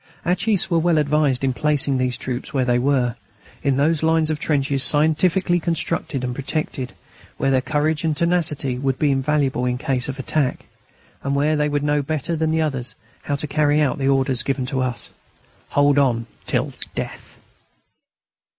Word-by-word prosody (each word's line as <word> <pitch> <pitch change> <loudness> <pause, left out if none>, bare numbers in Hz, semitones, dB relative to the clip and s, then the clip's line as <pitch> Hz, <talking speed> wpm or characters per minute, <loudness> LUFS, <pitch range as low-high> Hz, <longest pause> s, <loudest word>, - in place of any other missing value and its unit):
Our 175 - +3
chiefs 200 +1 +1
were 170 - +4
well 170 0 +2
advised 145 -3 +2
in 130 -1 +1
placing 140 -1 +1
these 125 -1 0
troops 130 -1 -5
where 135 -4 +1
they 120 0 +2
were, 125 -2 +1 0.5
in 140 -2 +1
those 150 +2 +2
lines 160 -1 +2
of 155 - -2
trenches 140 -3 0
scientifically 160 +6 +3
constructed 165 -5 -2
and 125 -1 -2
protected, 140 -1 -3 0.4
where 135 - +1
their 130 -1 +3
courage 150 +3 0
and 155 -2 0
tenacity 155 -7 0
would 135 -1 0
be 150 -2 +2
invaluable 135 -2 +1
in 125 0 0
case 130 -2 -1
of 135 - -4
attack, 135 0 -1 0.6
and 140 +1 -1
where 150 +2 +2
they 150 0 +1
would 145 0 -1
know 145 0 +2
better 155 +3 -2
than 160 0 0
any 160 0 +1
others 135 -5 -3 0.3
how 145 - -2
to 140 - -3
carry 150 0 +2
out 140 -4 +1
the 135 - 0
orders 135 -2 +2
given 135 -2 -1
to 130 0 -2
us: 125 -4 -3 0.6
"Hold 145 0 +3
on 120 -4 +1 0.2
till - - -1 0.2
death." - - -6
145 Hz, 180 wpm, -21 LUFS, 130-155 Hz, 0.6 s, were